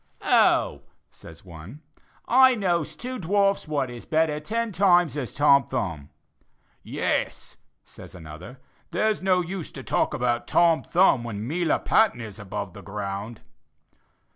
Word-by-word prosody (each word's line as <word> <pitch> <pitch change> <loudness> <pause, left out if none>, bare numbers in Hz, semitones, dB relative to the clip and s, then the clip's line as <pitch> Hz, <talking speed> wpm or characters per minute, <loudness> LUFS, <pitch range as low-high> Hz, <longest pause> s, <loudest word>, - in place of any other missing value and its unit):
"Oh," 70 - +3 0.3
says 80 +3 -15
one, 90 - -12 0.5
"I 260 +1 +6
knows 175 -7 -1
two 255 +1 -6
dwarfs 195 0 +1
what 140 -4 -2
is 120 -1 -10
better 155 -1 +1
ten 230 +8 -3
times 175 -4 +3
as 140 -5 -4
Tom 140 -1 +4
Thumb." 85 - -4 0.7
"Yes," - - -3 0.3
says - - -14
another, 85 +8 -11 0.3
"there's 215 -1 0
no 185 -1 +2
use 180 -1 -6
to - - -8
talk - - 0
about 120 -1 -1
Tom 170 -2 +3
Thumb 175 -9 +3
while 115 -3 -6
Melia 155 +12 -1
Patton 220 - +2
is 110 -3 -8
above 100 -2 -6
the 100 - -11
ground." 100 +2 -6
145 Hz, 140 wpm, -25 LUFS, -, 0.7 s, I